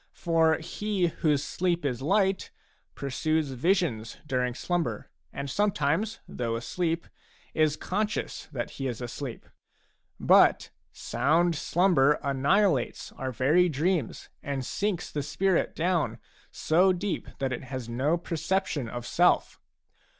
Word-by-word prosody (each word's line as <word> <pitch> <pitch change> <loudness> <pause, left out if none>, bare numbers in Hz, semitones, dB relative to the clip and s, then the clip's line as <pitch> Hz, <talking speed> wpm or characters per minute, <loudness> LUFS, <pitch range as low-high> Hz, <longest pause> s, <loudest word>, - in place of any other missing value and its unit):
For 165 -2 +3
he 190 +2 -1
whose 150 -3 +2
sleep 175 -2 -1
is 130 -2 -1
light 190 +5 +1 0.5
pursues 150 +2 -1
visions 130 - 0
during 125 -3 -1
slumber, 175 +2 -2 0.2
and 140 0 -5
sometimes, 195 +3 0
though 115 -2 -3
asleep, 165 +8 -2 0.5
is 155 -1 +2
conscious 210 +3 -2
that 120 -3 -4
he 135 - -4
is 120 -3 -4
asleep; 120 +1 -6 0.7
but - - +5 0.2
sound 170 +4 +1
slumber 155 -3 +3
annihilates 140 - +1
our 130 0 -4
very 150 +9 +3
dreams 160 -2 -1
and 135 -2 -3
sinks 185 +3 -2
the 150 - -2
spirit 190 +5 0
down 165 -9 0 0.3
so 180 +4 +3
deep 185 +2 -3
that 135 -1 -1
it 125 - -5
has 130 -2 -5
no 135 +8 +1
perception 165 - -2
of 120 +1 -6
self. 175 +6 +2
155 Hz, 120 wpm, -28 LUFS, 135-180 Hz, 0.7 s, but